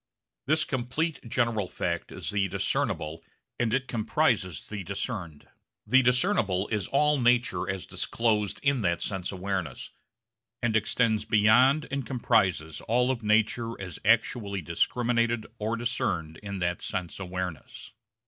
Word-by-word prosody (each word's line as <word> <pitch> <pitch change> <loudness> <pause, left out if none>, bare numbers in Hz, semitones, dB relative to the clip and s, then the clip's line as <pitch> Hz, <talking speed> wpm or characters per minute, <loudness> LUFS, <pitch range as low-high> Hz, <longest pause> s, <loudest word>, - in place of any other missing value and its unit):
This 155 +2 +3
complete 135 +5 -2
general 115 -5 +1
fact 85 -1 -3
is - - -5
the 100 -1 +1
discernible 80 -2 -2 0.4
and 120 -2 +1
it 130 +2 0
comprises 110 - 0
the 105 -2 -5
discerned. 95 - -5 0.4
The 130 0 +5
discernible 125 - +2
is 105 -4 -1
all 150 +1 +3
nature 120 -7 +2
as 95 -2 -3
disclosed 110 -3 0
in 140 -3 +2
that 85 -3 0
sense 95 -3 -3
awareness, 95 -6 -4 0.7
and 120 -2 0
extends 110 0 +2
beyond 115 +7 +4
and 140 0 -1
comprises 95 - +1
all 125 +3 +3
of 125 -3 -3
nature 110 +2 +1
as 90 -4 -7
actually 105 -3 +2
discriminated 115 +5 +1
or 110 +2 -1
discerned 90 -9 -2
in 100 -1 -5
that 90 -1 -1
sense 90 0 -4
awareness. 90 -5 -6
110 Hz, 130 wpm, -28 LUFS, 95-120 Hz, 0.7 s, The